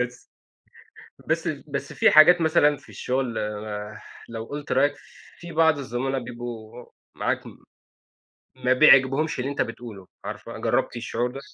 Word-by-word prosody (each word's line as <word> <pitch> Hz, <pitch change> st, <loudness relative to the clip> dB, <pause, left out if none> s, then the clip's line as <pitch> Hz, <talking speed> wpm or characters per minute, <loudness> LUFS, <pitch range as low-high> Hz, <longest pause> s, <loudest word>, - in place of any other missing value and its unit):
بس 125 Hz, 0 st, -5 dB, 1.0 s
بس -, -, 0 dB
بس -, -, -5 dB
في -, -, +4 dB
حاجات 175 Hz, +3 st, +8 dB
مثلًا 160 Hz, -2 st, +3 dB
في 140 Hz, 0 st, -19 dB
الشغل 130 Hz, -2 st, -2 dB, 0.9 s
لو 115 Hz, -1 st, -6 dB
قُلت 145 Hz, +4 st, -6 dB
رأيك، 140 Hz, +3 st, +3 dB, 0.5 s
في 175 Hz, 0 st, -9 dB
بعض 160 Hz, -1 st, +3 dB
الزملاء 135 Hz, 0 st, -2 dB
بيبقوا 120 Hz, -1 st, -8 dB, 0.3 s
معاك -, -, -1 dB, 1.2 s
ما 125 Hz, -, +1 dB
بيعجبهمش 135 Hz, +2 st, +5 dB
اللي 135 Hz, +2 st, -2 dB
أنت 140 Hz, -, 0 dB
بتقوله، 115 Hz, -5 st, -8 dB, 0.2 s
عارفة؟ -, -, -7 dB
جربتِ -, -, 0 dB
الشعور 120 Hz, +1 st, -2 dB
ده؟ 135 Hz, -, -7 dB
130 Hz, 130 wpm, -24 LUFS, 120-145 Hz, 1.2 s, حاجات